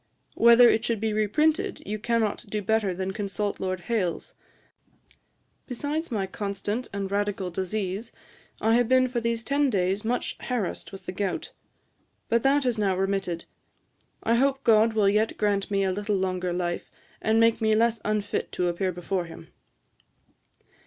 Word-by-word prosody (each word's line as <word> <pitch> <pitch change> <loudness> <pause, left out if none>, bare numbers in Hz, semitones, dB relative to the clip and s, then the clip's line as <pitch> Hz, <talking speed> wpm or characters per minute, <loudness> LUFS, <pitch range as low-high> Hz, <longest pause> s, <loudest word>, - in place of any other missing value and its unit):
Whether 235 +1 +7
it 220 -1 +3
should 230 -3 -1
be 220 0 -1
reprinted, 260 +10 +1
you 215 +2 -3
cannot 230 0 0
do 210 0 -2
better 220 -1 +1
than 190 +1 -3
consult 205 +1 -3
Lord 185 -1 -2
Hailes. 185 -4 -2 1.3
Besides 290 +6 -3
my 210 -6 -1
constant 205 +4 -3
and 195 -1 -4
radical 200 -2 -1
disease, 190 +4 -3 0.5
I 225 - +2
have 245 -1 +2
been 255 0 +5
for 245 -1 -2
these 230 0 -1
ten 280 +3 +2
days 195 -1 0
much 240 +3 -2
harassed 240 -8 -3
with 195 -2 -10
the - - -4
gout; 190 0 -3 0.8
but 230 0 +3
that 275 +2 +3
has 245 -4 0
now 195 -3 +1
remitted. 190 -3 -1 0.8
I 230 - +2
hope 275 +1 +1
GOD 225 -1 +5
will 215 -2 +3
yet 210 +3 +2
grant 205 -2 0
me 200 -1 +1
a 190 - +1
little 205 +2 -1
longer 185 -1 -1
life, 175 0 -2 0.3
and 220 +1 +2
make 230 0 +4
me 220 -1 +3
less 230 0 +2
unfit 210 -1 -1
to 180 -1 0
appear 185 +2 -1
before 180 +1 -2
him.' 165 - -12
210 Hz, 160 wpm, -26 LUFS, 190-230 Hz, 1.3 s, Whether